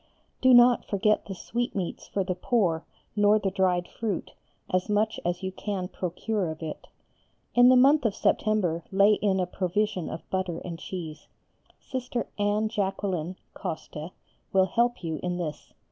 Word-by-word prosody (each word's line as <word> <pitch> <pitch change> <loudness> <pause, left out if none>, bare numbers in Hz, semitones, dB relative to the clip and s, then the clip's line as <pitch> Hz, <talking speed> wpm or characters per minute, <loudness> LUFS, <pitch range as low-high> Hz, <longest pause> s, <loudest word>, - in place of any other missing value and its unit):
Do 260 - +6
not 245 0 +7
forget 210 +1 +1
the 195 - -5
sweetmeats 210 -3 -3
for 195 - -1
the 185 0 -1
poor 180 -4 +1 0.3
nor 205 0 +5
the 200 -2 -1
dried 180 -2 +1
fruit, 215 -6 -4 0.3
as 185 +2 0
much 215 +1 +1
as 175 +2 -2
you 190 - -2
can 190 -2 -4
procure 190 +1 -2
of 160 +1 -6
it. 155 - -6 0.7
In 245 +1 +7
the 255 - +7
month 275 +4 +6
of 210 - +1
September 185 -6 +1
lay 200 +2 +5
in 200 -2 +1
a 180 - +1
provision 185 0 -1
of 160 - -7
butter 185 -3 -1
and 170 -2 -6
cheese; 160 -5 -7 0.5
Sister 250 -2 -4
Anne 205 +1 +2
Jacqueline 195 -5 -2 0.2
(Coste) 155 +1 -6 0.4
will 190 -1 +4
help 235 +3 0
you 160 -2 -3
in 180 0 -2
this. 160 -4 -5
195 Hz, 160 wpm, -27 LUFS, 175-215 Hz, 0.7 s, not